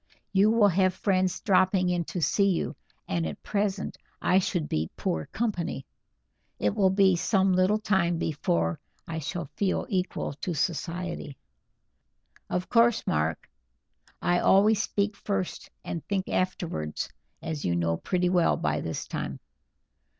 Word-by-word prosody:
You 200 +2 +5
will 220 -2 +5
have 185 0 +2
friends 185 -2 +1
dropping 185 -1 +3
in 175 -1 0
to 175 - -4
see 200 +4 +3
you, 180 - -1 0.3
and 85 -2 -1
at 75 - -7
present 200 -1 -2 0.2
I 185 - +4
should 175 -4 -1
be 80 +1 -1
poor 80 -1 -2
company. 195 - -2 0.7
It 105 - +1
will 195 -2 +4
be 190 -1 +4
some 190 +2 +2
little 185 +3 +3
time 190 -5 +1
before 85 - 0 0.3
I 160 -1 -3
shall 160 0 -5
feel 195 -2 0
equal 185 -6 -1
to 170 +4 -4
society." 170 -1 -3 1.1
"Of 180 0 -1
course, 235 -1 +3
Mark. 80 +1 -1 0.8
I 175 0 +3
always 210 +2 +5
speak 205 0 -1
first 195 -3 -3 0.2
and 165 - -4
think 195 -2 -1
afterwards, 165 - -2 0.4
as 155 -3 -4
you 85 - +1
know 85 -1 +1
pretty 180 - 0
well 180 -2 +3
by 75 0 0
this 80 - -4
time. 65 0 -4
180 Hz, 145 wpm, -27 LUFS, 150-195 Hz, 1.1 s, You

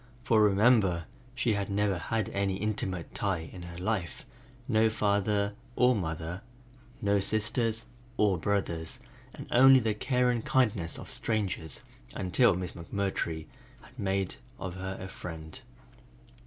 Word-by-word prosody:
For 110 -2 +4
remember, 100 -4 +4 0.3
she 120 -3 +1
had 100 -1 -2
never 100 -2 +1
had 110 0 -1
any 100 -1 0
intimate 95 -3 -2
tie 90 -5 -2
in 90 - -8
her 85 -1 -8
life, 95 -1 -2 0.4
no 110 -3 +4
father 100 -1 +1 0.2
or 125 0 +4
mother, 80 -1 -3 0.6
no 100 0 +3
sisters 110 +2 0 0.3
or 100 -5 +3
brothers, 85 -3 -1 0.4
and - - -8
only 130 +2 +8
the 110 -3 0
care 125 +2 +2
and 120 -2 -1
kindness 105 -10 +1
of - - -8
strangers 100 -7 -2 0.3
until 95 +4 +3
Miss 90 -1 -3
McMurtry 85 -3 -3 0.4
had 125 +3 -17
made 95 -2 -1 0.2
of 95 -2 -4
her 95 +1 -5
a 95 - -6
friend. 80 -4 -7
100 Hz, 135 wpm, -30 LUFS, 90-110 Hz, 0.6 s, only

